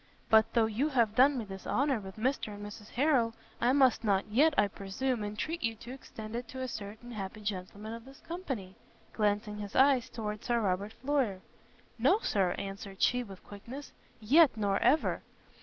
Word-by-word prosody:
But 220 0 +5
though 230 -2 +5
you 230 +8 0
have 235 -7 +2
done 265 +4 +5
me 230 - -3
this 195 -1 -9
honour 275 -3 +1
with 190 -2 -9
Mr 220 -2 -1
and 205 0 -8
Mrs 210 0 -10
Harrel, 245 -4 +2 0.3
I 240 - +4
must 265 -4 +4
not 200 -3 +2
yet, 285 +8 +4
I 205 - +5
presume, 210 +4 -2
entreat 225 +11 -3
you 225 -2 0
to 235 +3 -10
extend 220 -4 -8
it 240 0 -4
to 260 +2 -7
a 260 - -2
certain 220 +1 -7
happy 210 -1 -6
gentleman 205 +2 -5
of 230 0 -9
this 270 0 -14
company;" 265 - -5 0.4
glancing 210 0 0
his 205 -1 -7
eyes 265 -2 +4
toward 210 -2 -5
Sir 240 -1 +1
Robert 200 0 -1
Floyer. 260 -9 -1 0.6
"No, - - +5
Sir," 195 - +1
answered 195 0 -6
she, 250 +1 +3
with 195 -6 -10
quickness, 240 +8 -9 0.3
"yet, 270 +5 +5
nor 200 -2 +1
ever!" 310 - +2
220 Hz, 185 wpm, -31 LUFS, 205-260 Hz, 0.6 s, But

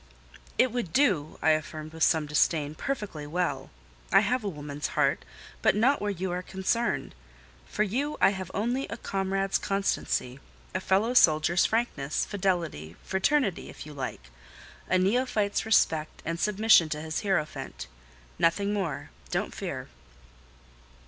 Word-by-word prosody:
"It 255 -1 +4
would 235 -9 -3
do," 185 - +2
I 160 - +5
affirmed 155 0 -3
with 160 - -10
some 160 -1 +4
disdain, 150 0 +1
"perfectly 195 - -4
well. 150 -5 -2 0.4
I 195 - +7
have 240 +4 0
a 205 - -1
woman's 145 -3 -5
heart, - - +2 0.4
but - - +4
not 255 +7 +3
where 205 - -1
you 190 -2 -3
are 180 +1 -2
concerned; 190 +4 -1 0.5
for 210 - 0
you 270 +9 -2
I - - +5
have 190 -2 -5
only 240 +6 -1
a 225 - -6
comrade's 195 -1 -1
constancy; 195 -9 -1 0.3
a 185 - 0
fellow 200 +6 +1
soldier's 165 -4 +5
frankness, 185 -12 -1
fidelity, 175 - -2
fraternity, 195 - +1
if - - -10
you 150 - -9
like; 125 - -6 0.6
a 185 - +4
neophyte's 210 +1 +1
respect 160 -8 +2
and 165 +1 -2
submission 210 -5 +5
to 150 -1 -3
his 160 0 -3
hierophant: 185 -7 -2 0.5
nothing 200 +5 +2
more—don't 190 -7 -3
fear." - - -5
190 Hz, 140 wpm, -28 LUFS, 155-210 Hz, 0.6 s, I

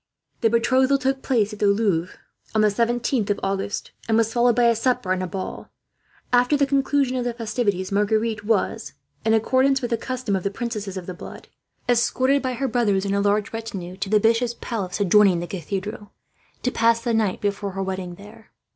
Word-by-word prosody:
The 225 - +3
betrothal 260 +4 +3
took 265 0 -1
place 220 -5 +1
at 210 - -9
the 205 - +3
Louvre 200 -4 +1 0.4
on 215 - +4
the 215 - +5
17th 235 +1 0
of 205 - 0
August, 195 +1 -2 0.2
and 225 -1 +2
was 225 0 +1
followed 240 -1 +3
by 245 - +3
a 235 -1 +4
supper 245 -4 0
and 185 0 +1
a 185 - -2
ball. 190 +1 -6 0.6
After 245 +4 +4
the 280 - +3
conclusion 275 -1 +1
of 250 - -1
the 240 -1 -3
festivities 210 -5 -1
Marguerite 215 +2 +1
was, 220 +1 -1 0.3
in 220 0 +3
accordance 260 +4 +3
with 245 -2 -4
the 230 - +2
custom 255 -6 -3
of 190 - -1
the 200 - -1
princesses 210 -3 -4
of 180 - -6
the 185 - -6
blood, 175 - -11 0.4
escorted 260 +3 +2
by 255 -1 -2
her 270 +3 -2
brothers 210 -5 +1
and 200 - -1
a 200 - +1
large 205 +1 +1
retinue 200 -6 -6
to 195 0 -4
the 210 0 +4
Bishops' 230 +2 +2
Palace 200 -6 -4
adjoining 200 -2 +5
the 175 - -3
Cathedral, 195 +4 -5 0.5
to 250 - +1
pass 230 0 +3
the 230 0 -1
night 215 -4 +1
before 200 -1 -2
her 195 0 -2
wedding 185 -2 -4
there. 210 +4 -15
220 Hz, 200 wpm, -23 LUFS, 200-245 Hz, 0.6 s, the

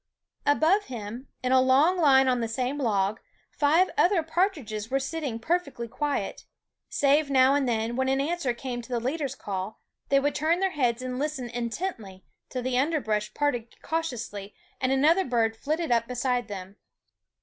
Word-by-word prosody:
Above 325 +8 +3
him, 235 +2 -7 0.2
in 255 - 0
a 260 0 +6
long 270 +8 +4
line 270 -6 +5
on 250 -2 +2
the 230 - -1
same 255 +5 -2
log, 205 -5 +1 0.3
five 320 +6 +3
other 355 -2 +4
partridges 300 - -1
were 270 - +1
sitting 280 -3 -3
perfectly 280 -2 -2
quiet, 290 +5 -3 0.5
save 285 +1 +3
now 265 0 +5
and 280 -3 +1
then, 225 0 -1
when 260 +1 0
an 270 0 +2
answer 300 -2 0
came 240 0 -5
to 235 - -14
the 245 -2 0
leader's 275 +2 -2
call, 195 -1 -5 0.3
they 275 - +5
would 290 +1 0
turn 320 +4 +1
their 385 0 +1
heads 250 -5 0
and 255 0 -4
listen 290 -4 -2
intently 235 - -4 0.2
till 255 -1 -4
the 255 0 +1
under 310 +3 +1
brush 210 -4 -1
parted 245 -6 -2
cautiously 235 -11 -4 0.2
and 255 0 0
another 310 +8 +4
bird 230 -4 +1
flitted 310 +5 -2
up 230 -1 +2
beside 250 0 -1
them. 195 -1 -8
260 Hz, 170 wpm, -27 LUFS, 235-295 Hz, 0.5 s, a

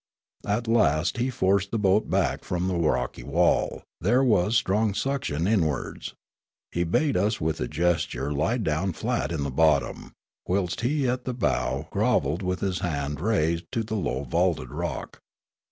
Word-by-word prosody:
At 110 +3 0
last 90 - +2
he 125 +2 0
forced 100 -4 +1
the 115 - -1
boat 105 0 +2
back - - 0
from 90 0 -2
the 95 - 0
rocky 80 -7 0
wall: - - +1 0.2
there 130 +2 +3
was 105 -3 +3
strong 105 -2 +2
suction 130 - -1
inwards. 85 -9 -1 0.6
He 85 - 0
bade 140 - +1
us 105 +4 +1
with 80 -1 -1
a 65 - -1
gesture 75 -4 0
lie 80 - +1
down 90 -3 -1
flat 80 - -2
in 80 -4 -2
the 70 - -3
bottom, 75 0 +1 0.3
whilst 90 -1 -1
he 135 +2 +1
at 125 +1 -1
the 125 - -3
bow 65 - -1
grov - - +2
elled 75 +7 -2
with 90 0 -2
a 95 -2 -1
hand 75 -4 -2
raised 85 -5 0
to 115 -3 0
the 110 0 -6
low 70 -9 -2
valuted 80 -2 0
rock. - - -5
90 Hz, 170 wpm, -26 LUFS, 80-110 Hz, 0.6 s, there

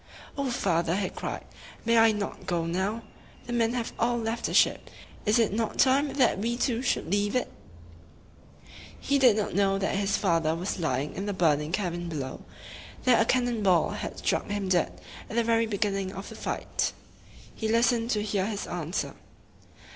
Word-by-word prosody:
"O 280 -2 -1
father!" 170 -7 +1
he 195 -1 -1
cried, - - -5 0.4
"may 230 0 +3
I 225 0 +6
not 210 -1 -5
go 170 -2 0
now? 190 +7 -1 0.4
The 240 - -5
men 230 -1 +2
have 240 -2 -3
all 240 +1 +2
left 225 0 -2
the - - -2
ship. - - +3 0.4
Is 210 - +4
it 225 -4 +2
not 225 0 -1
time 275 +2 +3
that 255 -7 +3
we 235 +3 -1
too 245 -1 0
should 245 -8 -1
leave 205 +2 +1
it?" 250 - 0 1.5
He 280 0 +1
did 245 -5 +6
not 210 - -1
know 195 +1 +2
that 195 - -1
his 200 0 +1
father 165 -4 +1
was 180 +3 -3
lying 145 -3 -1
in 195 +2 -4
the 205 - -1
burning 155 -4 +2
cabin 175 -3 -2
below, 135 -5 -5 0.6
that 250 -3 +5
a - - +3
cannon 245 -2 +1
ball 185 -4 +3
had - - -5
struck - - -1
him 205 -2 -2
dead 180 -3 +1 0.3
at - - -6
the 235 - +3
very 230 0 +2
be 210 -2 -2
gin 205 -1 +1
ning 195 -1 -3
of 195 - -7
the - - -9
fight. - - -2 0.6
He 220 - -3
listened 230 +1 +2
to 210 -3 +1
hear 205 -2 0
his 210 -2 -3
answer. 175 +1 -3
205 Hz, 190 wpm, -28 LUFS, 185-230 Hz, 1.5 s, I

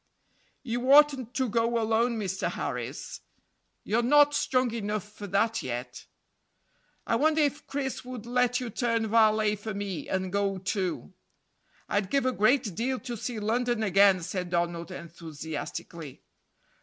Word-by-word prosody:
"You 245 +1 -1
oughtn't 280 -5 +5
to 260 -1 +1
go 230 +1 +1
alone, 225 +2 +1
Mr. 190 -3 -2
Harris; - - -5 0.6
you're 225 +3 +1
not 290 +4 +5
strong 255 -4 +1
enough 210 -3 -2
for 210 0 -9
that 220 +4 +1
yet." 125 0 -6 1.0
"I - - +1
wonder 310 +3 +3
if 290 +1 -2
Chris 275 -2 -3
would 250 -3 -8
let 245 0 +1
you 245 -3 -5
turn 230 0 0
valet 215 -1 +3
for 210 0 -6
me 200 -4 -4
and 190 0 -2
go 200 -1 0
too." 185 0 -3 0.7
"I'd 205 -2 0
give 275 +1 +1
a 255 - +3
great 220 -1 +2
deal 250 +6 -1
to 245 -2 -5
see 230 +1 -4
London 235 +2 0
again," 195 -2 +4
said 180 +1 -4
Donald 170 0 -1
enthusiastically. 160 -3 -7
220 Hz, 145 wpm, -28 LUFS, 190-245 Hz, 1.0 s, oughtn't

